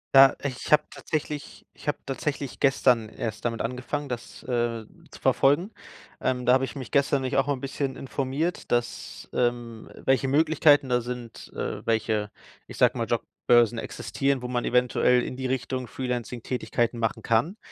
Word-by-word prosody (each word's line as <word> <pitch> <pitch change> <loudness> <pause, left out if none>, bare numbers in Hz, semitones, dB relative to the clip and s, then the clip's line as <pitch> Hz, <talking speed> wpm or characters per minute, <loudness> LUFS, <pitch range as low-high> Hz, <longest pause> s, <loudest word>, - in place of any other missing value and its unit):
Ja, 135 0 +9
ich 135 -1 -4
habe 150 - +6
tatsächlich 150 -2 -4
ich - - -15
habe 145 - +1
tatsächlich 140 0 -3
gestern 125 -5 +3
erst 110 0 -5
damit 115 -1 -1
angefangen, 130 +4 -3
das, 120 -1 -7
äh, 120 -3 -1 0.2
zu - - -13
verfolgen. 170 +10 +3 0.5
Ähm, 125 -1 0
da 125 - +6
habe 130 +1 +3
ich - - -9
mich 130 -3 -7
gestern 140 -1 +2
nämlich 130 - -2
auch 135 +1 +3
mal 145 - +2
'n 130 - -9
bisschen 135 -1 -3
informiert, 135 +5 -3
dass, 120 0 -2
ähm 120 -2 -1 0.2
welche 135 0 +3
Möglichkeiten 145 -1 +4
da 125 0 +2
sind, 120 -1 -7
äh, - - -3
welche, 110 -2 +1 0.4
ich - - -10
sage - - +4
mal, - - -2
Jobbörsen 120 -1 +2
existieren, 135 +2 -2
wo 125 - -2
man 120 -1 -1
eventuell 125 0 +3
in - - -5
die 130 0 -3
Richtung 130 -1 -2
Freelancing-Tätigkeiten 120 -1 -2
machen 115 -1 -1
kann. 135 - +1
125 Hz, 165 wpm, -26 LUFS, 120-135 Hz, 0.5 s, Ja